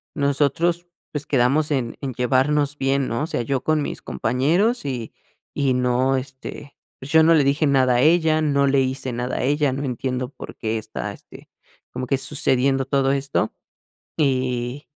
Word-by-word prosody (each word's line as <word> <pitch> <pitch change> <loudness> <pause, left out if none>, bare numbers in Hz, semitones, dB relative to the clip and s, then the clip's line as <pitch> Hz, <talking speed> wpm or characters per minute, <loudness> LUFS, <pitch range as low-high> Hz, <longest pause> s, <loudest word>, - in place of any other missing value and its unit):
nosotros, 150 +5 +1 0.2
pues, 150 -1 -4
quedamos 140 +4 +2
en 125 -5 -1
en 135 -3 -4
llevarnos 140 +4 +1
bien, 135 0 0
¿no?, 115 +6 -1
o - - -2
sea, - - -2
yo 135 +2 -1
con 155 -1 +1
mis - - -5
compañeros 160 - 0
y 125 -5 -4 0.4
y 140 -3 +1
no 125 +1 +1
este, 135 +2 -8 0.2
pues, 135 +2 -8
yo 160 0 +6
no 165 +1 +5
le 150 - +4
dije 140 +2 +2
nada 130 -3 +3
a - - +3
ella, 160 +1 +3
no 140 -2 +2
le 135 0 +3
hice 130 0 -2
nada 125 +1 -3
a - - -1
ella, 145 0 +1
no 140 +2 -3
entiendo 125 0 -3
por 145 - -10
qué 110 0 -2
está, 110 - -5
este, - - -15 0.4
como 125 0 -5
que 135 - +1
sucediendo 135 -1 +1
todo 135 0 +1
esto 140 0 -1 0.6
y 130 -1 -1
135 Hz, 175 wpm, -22 LUFS, 130-145 Hz, 0.6 s, yo